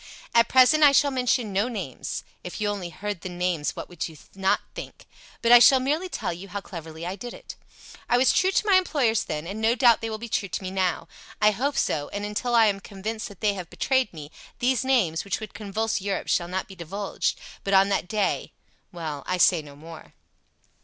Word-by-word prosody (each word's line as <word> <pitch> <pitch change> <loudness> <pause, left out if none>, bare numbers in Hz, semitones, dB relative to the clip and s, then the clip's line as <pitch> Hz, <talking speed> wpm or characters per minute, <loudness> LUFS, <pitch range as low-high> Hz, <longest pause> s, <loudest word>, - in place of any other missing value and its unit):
"At 235 0 +5
present 260 +4 +5
I 285 -1 +8
shall 285 +1 +4
mention 250 -4 0
no 200 +5 +1
names 195 - -5 0.2
if 180 - -7
you 210 - 0
only 195 -4 -4
heard 200 +2 -5
the 185 - -5
names, 175 -3 -2
what - - -6
would 175 -3 -5
you 160 - -13 0.2
not 190 0 +1
think! - - -9 0.4
but 235 - +3
I 240 - +11
shall 260 +2 +7
merely 305 +8 -1
tell 205 - -3
you 180 +4 -9
how 200 +1 -5
cleverly 165 -4 -8
I 180 +2 -3
did 240 +4 -8
it. - - -10 0.5
I 245 - +4
was 255 +1 +4
true 375 - +3
to 390 - +1
my 395 -3 +6
employers 275 - +1
then, 150 +1 -4
and 200 +5 -5
no 225 +2 +3
doubt 245 -3 +5
they 225 - -3
will 220 - -4
be 235 +2 -7
true 200 -3 -2
to 165 - -4
me 185 - -4
now. 190 -2 -1 0.3
I 210 0 +5
hope 270 +7 -2
so, 145 -1 0
and 205 0 -4
until 225 +4 -1
I 230 -1 +6
am 200 -2 +1
convinced 215 +3 -5
that 200 -5 -14
they 210 -2 +2
have 180 -3 -7
betrayed 260 -4 0
me, 150 -2 -10 0.3
these 255 +1 +1
names, 225 -12 +1
which 195 -5 -2
would 215 -1 -8
convulse 215 +1 -2
Europe, 200 0 -3
shall 175 - +1
not 185 +2 -3
be - - -11
divulged. 190 +3 -3 0.2
But 195 0 +1
on 195 +1 +5
that 195 -2 0
day... 210 0 -1 0.4
well, 160 -6 -5
I 185 - 0
say 175 -2 +4
no 145 -2 -13
more! 160 +2 -12
205 Hz, 225 wpm, -25 LUFS, 180-240 Hz, 0.5 s, I